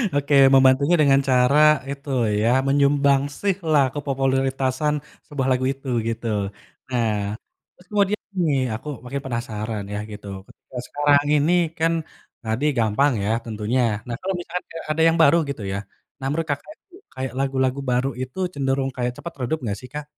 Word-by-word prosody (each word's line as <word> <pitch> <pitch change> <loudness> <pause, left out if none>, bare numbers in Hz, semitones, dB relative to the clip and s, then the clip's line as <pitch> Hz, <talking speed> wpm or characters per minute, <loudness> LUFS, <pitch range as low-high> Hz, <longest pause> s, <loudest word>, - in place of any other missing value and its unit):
Oke, 145 +1 0 0.2
membantunya 135 +4 +5
dengan 135 -2 +5
cara, 130 +3 +4 0.3
itu 140 +1 -7 0.3
ya, 115 - +3 0.2
menyumbangsih 140 +5 +2 0.2
lah, 145 -3 +5
kepopuleritasan 135 0 0 0.3
sebuah 135 -3 -2
lagu 130 0 0
itu, 135 0 -14 0.2
gitu. 115 +1 -3 0.6
Nah, 110 -4 -1 0.4
terus 180 - -21
kemudian 205 0 +1 0.2
nih, 150 -5 +2 0.2
aku 115 - -9 0.2
makin 135 +3 -4
penasaran, 110 -3 -3
yah, 105 - -2
gitu, 105 0 -9 0.2
ketika 130 - -13
sekarang 145 0 +3
ini, 150 +4 +2 0.3
kan, 165 +1 +2 0.5
tadi 110 +5 -1
gampang 115 +6 +3
ya, 100 - -1 0.2
tentunya. 110 +3 -1 0.3
Nah, 120 - -3
kalau 190 +1 -2
misalkan 175 +1 -5
ada 165 - -10
ada 155 +1 0
yang 165 0 +3
baru 160 +1 +6
gitu 140 -5 -5
ya, - - -2 0.4
nah 135 - -6
menurut 160 +3 -1
Kakak, 145 - -5 0.4
kayak 130 -2 -4
lagu-lagu 135 -1 0
baru 125 +2 +1
itu, 130 +4 -7 0.2
cenderung 135 -1 0
kayak 125 -1 -1
cepat 170 - -7
redup 140 +6 -1
nggak 105 -4 -2
sih, 125 - -11
Kak? 150 0 -5
135 Hz, 160 wpm, -23 LUFS, 125-145 Hz, 0.6 s, baru